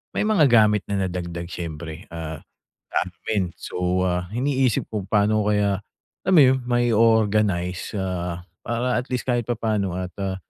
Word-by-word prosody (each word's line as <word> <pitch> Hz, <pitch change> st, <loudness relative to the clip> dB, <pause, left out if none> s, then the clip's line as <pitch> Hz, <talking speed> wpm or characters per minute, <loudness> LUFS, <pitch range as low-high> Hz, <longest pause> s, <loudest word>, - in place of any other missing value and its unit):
may -, -, +1 dB
mga 210 Hz, -8 st, +4 dB
gamit 105 Hz, -3 st, +5 dB
na 95 Hz, -2 st, 0 dB
nadagdag, 85 Hz, -1 st, -5 dB
syempre. 80 Hz, -1 st, -6 dB
Ah, 80 Hz, -2 st, -6 dB, 0.5 s
madami -, -, -1 dB
din. 105 Hz, -4 st, +1 dB
So, 90 Hz, +1 st, -1 dB
ah, 90 Hz, 0 st, -1 dB
iniisip 130 Hz, -1 st, +1 dB
kung 105 Hz, -3 st, -3 dB
paano 105 Hz, 0 st, +2 dB
kaya 105 Hz, -2 st, +2 dB, 0.5 s
alam 190 Hz, 0 st, +3 dB
mo -, -, +9 dB
yun, 130 Hz, 0 st, +4 dB
mai-o-organize, 110 Hz, -6 st, +2 dB
ah, 90 Hz, -2 st, -3 dB, 0.2 s
para 120 Hz, +1 st, 0 dB
at 125 Hz, -, -6 dB
least 125 Hz, -1 st, -1 dB
kahit 120 Hz, -2 st, 0 dB
papaano 105 Hz, -6 st, -1 dB
at, 90 Hz, 0 st, -4 dB
ah, 95 Hz, -1 st, -1 dB
105 Hz, 155 wpm, -23 LUFS, 90-120 Hz, 0.5 s, mo